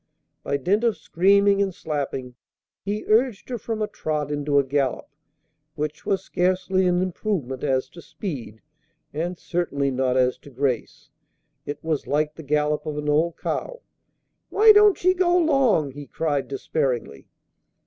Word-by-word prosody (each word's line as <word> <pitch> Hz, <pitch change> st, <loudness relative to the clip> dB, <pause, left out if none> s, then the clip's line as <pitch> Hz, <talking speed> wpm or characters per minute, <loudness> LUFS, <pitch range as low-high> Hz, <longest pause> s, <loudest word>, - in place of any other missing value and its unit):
By 140 Hz, -, -1 dB
dint 195 Hz, -, +1 dB
of 230 Hz, -3 st, +2 dB
screaming 200 Hz, +3 st, +3 dB
and 195 Hz, -1 st, +1 dB
slapping, 140 Hz, -6 st, -4 dB, 0.5 s
he 205 Hz, +2 st, -3 dB
urged 225 Hz, 0 st, +1 dB
her 245 Hz, -2 st, -3 dB
from 220 Hz, 0 st, -3 dB
a -, -, -1 dB
trot 150 Hz, -7 st, -3 dB
into 145 Hz, 0 st, 0 dB
a 140 Hz, -, +5 dB
gallop, 135 Hz, -1 st, -1 dB, 0.7 s
which 150 Hz, 0 st, -4 dB
was 195 Hz, -, 0 dB
scarcely 185 Hz, +1 st, +1 dB
an 180 Hz, 0 st, +2 dB
improvement 175 Hz, -, -3 dB
as 130 Hz, -1 st, +1 dB
to 170 Hz, -, -12 dB
speed, 125 Hz, -, -7 dB, 0.5 s
and 170 Hz, +4 st, -3 dB
certainly 140 Hz, -7 st, -1 dB
not 130 Hz, 0 st, 0 dB
as 125 Hz, -1 st, +2 dB
to -, -, -14 dB
grace. 130 Hz, -2 st, -3 dB, 0.6 s
It 145 Hz, 0 st, -5 dB
was 160 Hz, -3 st, -2 dB
like 150 Hz, +1 st, 0 dB
the 160 Hz, -, -10 dB
gallop 150 Hz, 0 st, 0 dB
of 150 Hz, -1 st, -3 dB
an 150 Hz, 0 st, -2 dB
old 160 Hz, +3 st, +1 dB
cow. -, -, -4 dB, 0.7 s
"Why 435 Hz, +1 st, +7 dB
don't 415 Hz, -3 st, +5 dB
ye 370 Hz, +1 st, +5 dB
go 360 Hz, -1 st, +3 dB
'long?" 265 Hz, -, +3 dB
he 145 Hz, +1 st, -9 dB
cried, 145 Hz, -4 st, -1 dB
despairingly. 130 Hz, -, -2 dB
155 Hz, 155 wpm, -24 LUFS, 140-200 Hz, 0.7 s, Why